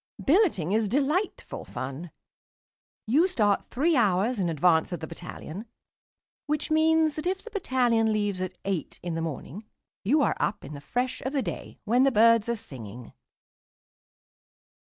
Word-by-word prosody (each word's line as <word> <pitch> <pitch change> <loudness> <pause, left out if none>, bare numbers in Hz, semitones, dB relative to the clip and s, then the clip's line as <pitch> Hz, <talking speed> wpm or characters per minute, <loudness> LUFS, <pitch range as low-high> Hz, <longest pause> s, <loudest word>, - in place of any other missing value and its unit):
Billeting 290 - +3
is 220 0 +2
delightful 290 - -1
fun. 135 +7 -6 1.0
You 290 +11 +4
start 210 - +1
three 310 +6 +1
hours 215 0 +2
in 180 -3 +1
advance 160 +2 +2
of 175 - -3
the 160 - -5
battalion, 175 +4 -8 0.8
which 300 +1 -2
means 315 0 +3
that 310 +3 -4
if 380 +1 -2
the 465 - -10
battalion 245 - +1
leaves 205 -3 -1
at 185 -1 -4
eight 190 -7 -3
in 175 -1 -3
the 165 - -2
morning, 160 - -6 0.4
you 285 +9 +3
are - - +1
up 205 -4 -1
in 145 - -8
the 145 - -8
fresh 250 - -2
of 265 +3 -4
the 275 -3 +1
day, - - -6
when 240 +4 +3
the 275 - +4
birds 230 0 +5
are 235 - +1
singing. 120 - -9
220 Hz, 155 wpm, -27 LUFS, 175-280 Hz, 1.0 s, birds